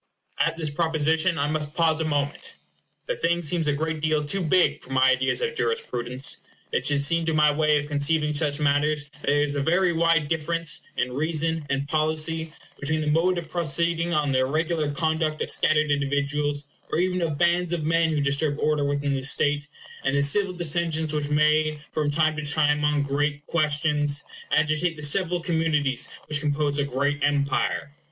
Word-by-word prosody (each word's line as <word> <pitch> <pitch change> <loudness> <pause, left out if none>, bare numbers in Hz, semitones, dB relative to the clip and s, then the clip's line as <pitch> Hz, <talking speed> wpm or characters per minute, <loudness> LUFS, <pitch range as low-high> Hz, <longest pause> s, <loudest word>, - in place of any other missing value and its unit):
At 165 0 +1
this 155 -3 -2
proposition 160 +2 +1
I 140 - +1
must 150 0 -3
pause 165 -2 +2
a - - -1
moment. 145 -2 -2 0.5
The - - -2
thing 170 - 0
seems 165 0 -1
a 150 - +2
great 160 +1 -3
deal 155 -1 +1
too 190 +7 -1
big 180 +2 +2
for - - -13
my 130 0 +4
ideas 130 - 0
of 470 -1 -1
jurisprudence. 130 - -2 0.3
It - - 0
should 145 -1 +2
seem 165 +3 +2
to 160 -1 0
my 150 -1 +5
way 150 0 +3
of 145 - -2
conceiving 150 +1 +1
such 145 -1 -1
matters 150 +1 +1
that 150 0 -23
there 145 +1 +3
is 145 -1 -1
a 140 - 0
very 175 +4 +2
wide 165 -2 +2
difference, 165 0 -1 0.2
in 125 0 0
reason 160 +2 -1
and 135 +1 -1
policy, 155 +1 0 0.3
between 155 +3 0
the 150 -1 0
mode 175 +4 +2
of 170 -2 -5
proceeding 170 +1 0
on 150 -3 +1
the 130 - +2
irregular 155 +3 0
conduct 160 +1 -1
of - - -2
scattered 155 -1 +2
individuals, 145 +1 -1 0.3
or - - 0
even 180 +1 0
of 160 -4 -1
bands 175 +1 +2
of 170 -3 -2
men 165 +1 +2
who 155 -2 0
disturb 140 +1 0
order 150 -1 +1
within 140 0 -1
the 135 - -2
state, 145 +2 +1 0.4
and 135 +1 0
the 140 - +2
civil 185 +7 +3
dissensions 165 -2 -1
which 150 -1 -2
may, 150 +1 +2
from 150 -2 -1
time 155 +1 +1
to - - -2
time, 150 0 +1
on 150 -1 +2
great 145 +1 -1
questions, 150 -2 0 0.3
agitate 155 +3 +1
the 150 - -9
several 175 +4 +1
communities 155 -6 0 0.2
which 150 -1 +1
compose 145 -1 0
a - - +2
great 140 +2 -1
empire. 145 0 0
150 Hz, 190 wpm, -25 LUFS, 145-165 Hz, 0.5 s, my